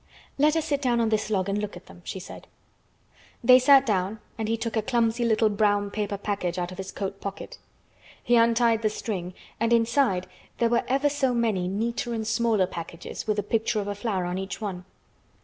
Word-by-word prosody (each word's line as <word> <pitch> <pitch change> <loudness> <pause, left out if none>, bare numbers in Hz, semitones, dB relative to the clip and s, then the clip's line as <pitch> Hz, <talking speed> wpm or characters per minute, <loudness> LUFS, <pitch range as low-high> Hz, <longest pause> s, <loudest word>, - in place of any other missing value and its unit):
"Let 300 +2 +4
us 320 - 0
sit 285 -1 -1
down 245 -3 +2
on 230 -1 +2
this 215 0 0
log 190 -3 0
and 200 +1 0
look 210 -3 -4
at 180 - -14
them," 175 - -15
she 190 - -5
said. 185 - -10 1.0
They 255 +2 +8
sat 275 +1 +6
down 200 -1 0 0.2
and 220 -1 -3
he 225 +1 0
took 230 0 -3
a 220 - +2
clumsy 235 0 +1
little 220 -1 +3
brown 205 -1 +1
paper 205 -1 -2
package 195 -3 -2
out 175 0 -2
of 185 - -10
his 190 0 -5
coat 195 -1 -5
pocket. 200 - -7 0.6
He 240 - +3
untied 230 -1 +4
the 215 - +2
string 185 -4 -5 0.2
and 230 +1 +1
inside 230 -5 +2 0.3
there 235 - +2
were 235 - +2
ever 275 +3 +2
so 275 -3 +1
many 215 -6 +1
neater 230 +4 -2
and 220 -1 -3
smaller 225 -3 +2
packages 170 +1 -7
with 215 -1 +1
a 205 - 0
picture 220 +1 0
of 205 - -3
a 205 - -1
flower 200 -3 -2
on 180 +1 -2
each 190 +1 -5
one. 190 -4 -5
215 Hz, 210 wpm, -26 LUFS, 195-235 Hz, 1.0 s, They